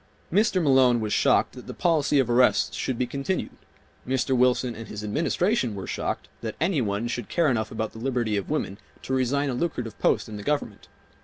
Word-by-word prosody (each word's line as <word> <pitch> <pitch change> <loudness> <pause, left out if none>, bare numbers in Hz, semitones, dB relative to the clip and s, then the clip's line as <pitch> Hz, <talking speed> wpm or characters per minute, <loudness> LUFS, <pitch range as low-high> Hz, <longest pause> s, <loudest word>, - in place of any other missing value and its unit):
Mr. 205 -1 +3
Malone 130 -4 +5
was 105 -2 -2
shocked - - +3
that - - -11
the - - -7
policy 155 -4 +2
of 135 -4 +3
arrests 120 +1 +3
should 130 - -2
be 125 - +1
continued. 140 +9 -3 0.6
Mr. 130 0 +1
Wilson 125 0 +2
and 115 0 -9
his 105 0 -7
Administration 155 - 0
were 95 - -5
shocked - - -3
that - - -4
any 165 -4 +1
one 105 +1 -1
should 120 -1 -4
care 170 -3 +2
enough 110 -3 -1
about 110 -1 -3
the 110 - -11
liberty 120 -3 -1
of 100 - -3
women 115 -9 -2 0.2
to 130 - -3
resign 135 +2 +1
a - - -2
lucrative 125 -6 -3
post - - +2
in 110 -1 -7
the - - -7
Government. 145 -8 -2
125 Hz, 205 wpm, -25 LUFS, 110-145 Hz, 0.6 s, Malone